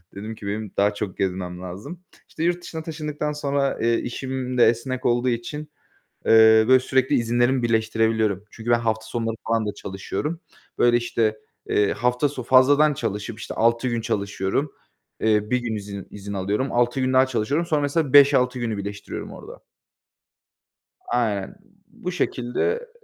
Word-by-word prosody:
Dedim 110 +3 -6
ki, 100 - -9
"benim 105 0 -4
daha 100 +1 +3
çok 105 -3 -5
gezmem 90 -2 -3
lazım." 100 - -8 0.3
İşte 160 - -5
yurt 175 +1 +1
dışına 160 -2 -6
taşındıktan 150 -2 -4
sonra, 140 -1 -1
eee, 115 0 +3
işim 130 0 -4
de 120 - +7
esnek 125 +2 -1
olduğu 120 +1 +2
için, 120 +5 -3 0.7
eee, 110 0 +7
böyle 130 0 +7
sürekli 130 0 +1
izinlerimi 120 +2 +2
birleştirebiliyorum. 110 -3 +1
Çünkü 115 +1 -6
ben 120 - +5
hafta 110 -1 -1
sonları 115 -1 -3
falan 115 -1 +1
da 105 - -2
çalışıyorum. 150 - -5 0.4
Böyle 120 0 +5
işte, 115 -2 0 0.3
eee, 105 -1 +2
hafta 125 +5 +1
so 135 -3 -6
fazladan 145 +5 +5
çalışıp 110 -2 -4
işte 110 - -6
6 115 +2 +2
gün 120 -1 -1
çalışıyorum. 105 +4 -2 0.5
Eee, 105 -1 +1
1 125 - +3
gün 120 -3 -3
izin 100 -1 -7
izin 100 0 -8
alıyorum. 100 +7 -1
6 120 +2 +1
gün 130 0 +1
daha 130 +1 +5
çalışıyorum. 130 +7 -1
Sonra 155 -3 +1
mesela 145 -1 0
5-6 135 -3 +6
günü 115 -3 -2
birleştiriyorum 100 0 -6
orada. - - -12 1.5
Aynen. 105 -5 -1 0.3
Bu 180 - -6
şekilde 185 - -1
120 Hz, 155 wpm, -23 LUFS, 105-130 Hz, 1.5 s, de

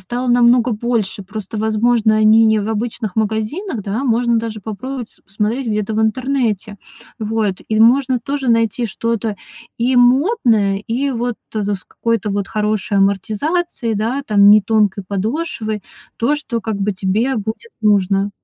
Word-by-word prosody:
стало 245 +1 -4
намного 240 0 +4
больше. 215 -3 -2
Просто, 210 +2 -7
возможно, 220 0 +2
они 215 +1 +5
не 220 0 +3
в 205 - -3
обычных 220 -2 -3
магазинах, 220 - -2
да, 205 +6 -3
можно 235 -2 +2
даже 225 -2 -5
попробовать 240 +4 -7
посмотреть 215 +6 -2
где-то 210 0 -1
в 220 - +1
интернете. 225 -4 -1 0.4
Вот, 215 -3 -1
и 220 0 +1
можно 255 +2 +4
тоже 275 +1 -3
найти 230 0 +1
что-то 225 0 -2 0.4
и 245 +2 +1
модное, 245 - +3
и 265 +4 -1
вот, 240 -1 -2 0.2
э, 215 - 0
с 185 - -8
какой-то 230 -2 -2
вот 200 -1 -2
хорошей 210 -1 -1
амортизацией, 225 - 0
да, 235 +7 -1
там, 205 -4 +5
не 210 +1 +7
тонкой 205 -2 +1
подошвой, 220 - -2 0.4
то, 265 +6 +1
что 245 -6 -4
как 220 0 -3
бы 200 +1 -1
тебе 210 +7 0
будет 220 - -5
нужно. 200 -1 +2
220 Hz, 150 wpm, -18 LUFS, 210-245 Hz, 0.4 s, не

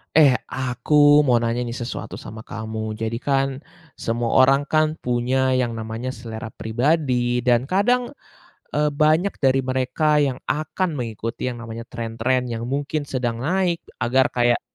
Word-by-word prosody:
Eh, 145 -5 +7 0.2
aku 145 +4 +4
mau 125 -4 +3
nanya 115 +1 -1
nih 120 - -4
sesuatu 120 - -6
sama 110 0 -9
kamu, 110 -1 -5
jadikan, 135 +4 -1 0.3
semua 120 +2 +1
orang 135 +2 +4
kan 155 +1 +1
punya 130 +2 +1
yang 125 -2 +1
namanya 115 +2 -4
selera 115 -2 -7
pribadi 125 +1 0
dan 120 -1 +4
kadang, 210 - +1 0.6
eee, 150 0 +2
banyak 155 +6 +2
dari 135 -1 +3
mereka 130 +4 +1
yang 140 -3 +1
akan 155 +3 -1
mengikuti 115 -2 -4
yang 120 - -9
namanya 115 0 -7
trend-trend 120 +2 -2
yang 115 -1 -4
mungkin 145 +4 -2
sedang 125 -4 -2
naik, 180 +1 0 0.2
agar 130 +3 +2
kayak, 120 -1 +2
130 Hz, 140 wpm, -22 LUFS, 115-145 Hz, 0.6 s, Eh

